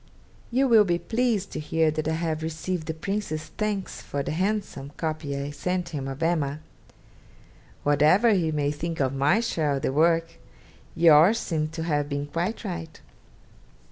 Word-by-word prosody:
You 265 +3 +2
will 225 -4 +7
be 175 -3 +1
pleased 220 +2 -1
to - - -4
hear 160 +1 +1
that 155 0 -3
I 160 - +1
have 160 -1 -2
received 160 +1 -3
the 160 - -2
Prince's 160 -3 -3
thanks 210 -3 -2
for 140 -1 -4
the - - -3
handsome 185 -6 -2
copy 155 -3 -3
I 140 +1 -4
sent 180 +3 -2
him 140 -5 -4
of 135 +4 -5
"Emma." 155 -4 0 1.2
Whatever 155 - +4
he 170 -5 +1
may 145 -1 0
think 165 +2 -4
of 135 -1 +1
my 145 +11 +3
share 155 -11 0
of 135 - -4
the 130 - 0
work, 165 +2 +2 0.6
yours 165 +5 +6
seems 155 -6 -2
to 160 - -3
have 145 -3 0
been 145 0 -2
quite 175 +11 -3
right. 170 -4 -6
160 Hz, 170 wpm, -26 LUFS, 150-185 Hz, 1.2 s, will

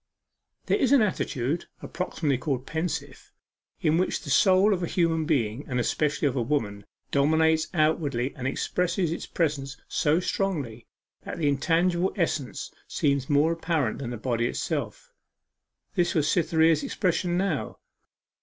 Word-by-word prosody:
There - - +1
is 265 -2 +2
an 265 -5 +6
attitude 155 - -1 0.2
approximatively 155 -7 -2
called 135 -3 -2
pensive 160 +2 -4 0.5
in 155 +2 +2
which 185 - -1
the 145 - -5
soul 190 +6 +5
of 185 - -2
a 175 - -1
human 165 -3 +1
being, 130 -5 0
and 125 -4 -1
especially 145 +4 0
of 135 - -1
a 125 - +1
woman, 110 -6 -2 0.2
dominates 160 +2 +3
outwardly 155 -6 +1
and 130 0 -3
expresses 180 +4 -1
its 165 - -4
presence 140 -4 -2
so 155 +3 +2
strongly, 150 - -2 0.3
that - - -7
the 160 -3 0
intangible 170 +5 +2
essence 155 - -2 0.2
seems 140 -2 0
more 145 +3 +4
apparent 165 -8 -1
than 130 -4 -4
the 120 - -5
body 120 0 0
itself. - - -4 0.8
This 175 -3 +1
was 155 -2 +2
Cytherea's 160 -2 +3
expression 175 -1 0
now. 185 -6 -1
155 Hz, 145 wpm, -26 LUFS, 135-175 Hz, 0.8 s, an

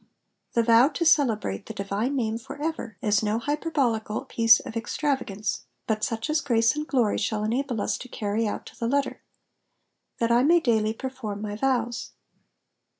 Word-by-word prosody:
The 235 - +3
vow 230 +3 +6
to 330 +3 -2
celebrate 225 - +2
the 220 - -7
divine 200 +7 -2
name 225 -3 -1
/<w 260 +4 -9
ever^^ 295 -8 -4
is 210 -2 +3
no 215 0 0
hyper 295 +7 -2
bolical 230 -8 -1
piece 230 -1 +5
of - - -9
extravagance, 230 - -2 0.2
but 215 -1 -1
such 225 +2 -1
as 305 0 +1
grace 230 -2 +2
and 300 0 -3
glory 240 -7 +1
shall 210 0 -1
enable 240 +2 -1
us - - -1
to 255 - -8
carry 220 -2 -1
out - - -4
to - - -12
the 230 - -1
letter. 280 +3 0 1.0
^^That 230 0 +1
I 240 +1 +5
may 335 +6 +5
daily 220 -7 +1
perform 255 -6 -5
my 205 -1 -4
vows.'' 240 -1 -1
230 Hz, 175 wpm, -26 LUFS, 215-270 Hz, 1.0 s, vow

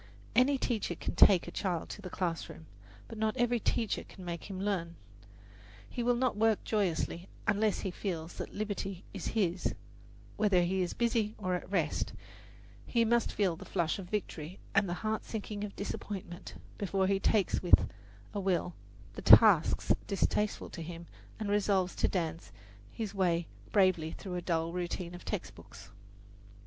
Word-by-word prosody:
Any 265 +4 +5
teacher 240 -4 -1
can - - -4
take 185 -4 +6
a - - -5
child 175 -4 -2
to - - -7
the 185 - -6
classroom, 170 -3 -3 0.4
but 225 - -8
not 220 0 0
every 240 0 +2
teacher 225 0 0
can 185 - -12
make 170 -1 -5
him 190 -2 -6
learn. 185 -4 -1 0.9
He 245 - -4
will 245 +1 +3
not 255 0 +1
work 220 0 +2
joyously 180 -3 -1 0.2
unless 210 -1 +2
he 190 - -2
feels 175 -3 -4
that - - -5
liberty 200 -3 -4
is 195 - -5
his, 180 -3 +1 0.6
whether 200 -5 +4
he 185 +2 +1
is 180 - -2
busy 230 -2 +1
or 185 -3 -1
at 180 - -3
rest; 170 -6 0 0.7
he 230 -1 +3
must 235 0 +2
feel 190 -5 +1
the - - -10
flush 170 +2 -1
of 180 -2 -8
victory 180 -5 -4 0.2
and 200 -1 +3
the 175 - -1
heart 220 0 0
sinking 210 -2 -5
of 205 -1 -5
disappointment 195 -3 -6 0.2
before 195 -1 +1
he 195 0 +2
takes 200 0 +2
with 180 - +6 0.5
a 205 - -2
will 185 -2 0 0.4
the - - -7
tasks - - +7
distasteful 210 +1 0
to 170 - -7
him 170 +1 -7 0.3
and 215 - -2
resolves 200 -3 +2
to - - +3
dance 165 -3 -3 0.4
his 215 -3 -4
way 175 -3 +1 0.3
bravely 185 -6 +3
through 190 -3 -7
a 180 - -2
dull 165 -1 -1
routine 175 0 -3
of 175 - -9
textbooks. - - -7
195 Hz, 165 wpm, -32 LUFS, 175-210 Hz, 0.9 s, tasks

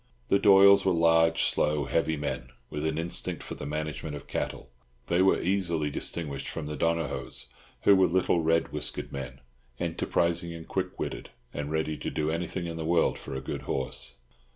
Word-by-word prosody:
The 100 - +4
Doyles 100 -1 +7
were 95 - +3
large, 80 0 +4
slow, 75 -1 +2
heavy 80 +1 0
men, 70 -4 -4 0.2
with 75 +1 -2
an 80 0 -1
instinct 85 +1 -2
for - - -6
the - - -6
management 75 0 -4
of 70 - -8
cattle; - - -4 0.3
they 85 +5 +2
were 95 - +4
easily 85 -5 0
distinguished 75 -2 -3
from 80 - -4
the 75 0 -4
Donohoes, 85 -5 -2 0.4
who 100 - +7
were 95 -1 +5
little 90 0 +2
red 80 +1 +2
whiskered - - -4
men, 65 -1 -7 0.4
enterprising 85 0 0
and 80 -1 -9
quick - - -3
witted, - - -4 0.2
and 75 0 -4
ready 80 0 -1
to - - -4
do 75 0 -1
anything 85 +2 -3
in 85 -1 -5
the 80 - -3
world 85 +1 +2
for - - -7
a 65 - -3
good 65 - -5
horse. 65 -1 -1
80 Hz, 180 wpm, -28 LUFS, 75-85 Hz, 0.4 s, Doyles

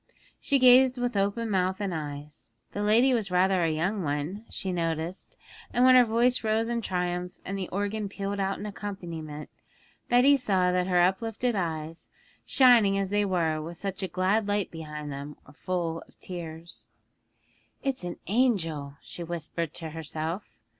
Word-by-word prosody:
She 280 - +2
gazed 255 0 +6
with 245 -2 -1
open 205 +3 0
mouth 190 0 +1
and 200 -3 -2
eyes; 150 -3 -6 0.2
the 205 - -4
lady 230 +6 +4
was 220 -5 0
rather 185 +1 +3
a 165 - +2
young 180 +7 -1
one, 155 +7 -3
she 190 - -3
noticed, 170 - -3 0.3
and 245 - +3
when 255 - +8
her 250 -1 +8
voice 240 +2 +2
rose 220 +1 +1
in 235 0 -1
triumph 180 -2 -2
and 195 - -3
the 190 -2 -4
organ 205 +2 -2
pealed 200 0 -4
out 195 0 0
in - - -6
accompaniment, 170 -7 -6 0.6
Betty 255 +4 +6
saw 190 -7 +2
that 180 0 +1
her 180 -1 +3
uplifted 225 +6 +1
eyes, 165 -3 -3 0.4
shining 235 -7 +5
as 195 -1 -1
they 205 0 +2
were 165 -5 0
with 165 +2 -7
such 195 -1 -4
a 190 - -1
glad 190 +5 +1
light 205 -1 0
behind 150 -2 -7
them, 140 +2 -7
were 145 - -16
full 170 0 -3
of - - -26
tears. 170 -2 -8 1.0
'It's 270 -7 -1
an 175 -1 -5
angel,' 165 - 0
she 175 - -8
whispered 165 -1 -3
to 160 -2 -4
herself. 160 - -5
185 Hz, 165 wpm, -28 LUFS, 165-215 Hz, 1.0 s, when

